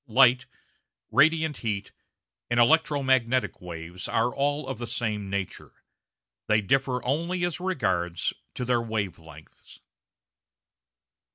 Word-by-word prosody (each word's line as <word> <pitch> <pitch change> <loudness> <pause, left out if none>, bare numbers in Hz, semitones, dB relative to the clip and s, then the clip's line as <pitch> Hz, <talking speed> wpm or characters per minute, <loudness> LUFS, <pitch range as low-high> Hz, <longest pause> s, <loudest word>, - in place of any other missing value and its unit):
Light, 125 +1 +5 0.6
radiant 160 0 +3
heat, 105 -3 -3 0.6
and 120 0 +2
electro 150 +2 +4
magnetic 130 -1 +1
waves 85 0 -7
are 115 +2 +1
all 145 +1 -1
of 135 -4 -5
the 120 - -4
same 110 -4 -2
nature; 100 -1 -4 0.7
they 110 0 +4
differ 125 +4 0
only 170 +7 0
as 175 -1 -3
regards 95 - -1 0.2
their 125 -1 0
wave 110 -6 -3
lengths. 80 -2 -15
120 Hz, 110 wpm, -27 LUFS, 100-140 Hz, 0.7 s, Light